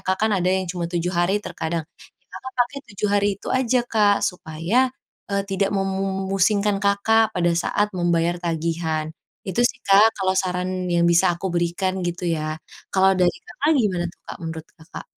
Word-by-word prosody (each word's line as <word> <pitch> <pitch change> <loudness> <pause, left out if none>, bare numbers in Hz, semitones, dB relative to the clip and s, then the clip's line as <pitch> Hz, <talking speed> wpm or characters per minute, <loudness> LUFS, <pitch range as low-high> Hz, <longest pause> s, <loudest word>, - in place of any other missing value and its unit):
Kak, 190 +3 0
kan 220 - +2
ada 180 -1 +1
yang 190 0 +1
cuman 175 -1 -3
7 175 +1 -2
hari 175 +3 +2
terkadang, 160 0 -3 0.4
ya - - -41
Kakak 260 - -8
pakai 245 +3 +1
7 205 +1 -1
hari 205 0 +3
itu - - -9
aja 255 -1 +2
Kak, 210 -4 +3
supaya, 180 +9 0 0.4
eee, 200 0 +1
tidak 195 0 0
memusingkan 195 +1 0
Kakak 220 +2 +3
pada 175 -1 +2
saat 205 +4 +1
membayar 175 -1 +1
tagihan. 165 -2 -2 0.3
Itu 190 +2 -1
sih 250 +1 0
Kak 205 +3 +6
kalau 190 -1 +1
saran 185 0 -1
yang 170 -1 +2
bisa 170 +1 +4
aku 190 +2 -3
berikan, 175 +2 -1
gitu 175 +1 -3
ya. 155 -2 -2 0.4
Kalau 190 0 +4
dari 180 -1 +2
Kakak, 315 -4 -1
gimana 190 -8 +1
tuh 170 - -16
Kak, - - -7
menurut 160 -1 -6
Kakak? 160 +3 -10
185 Hz, 175 wpm, -22 LUFS, 170-200 Hz, 0.4 s, Kak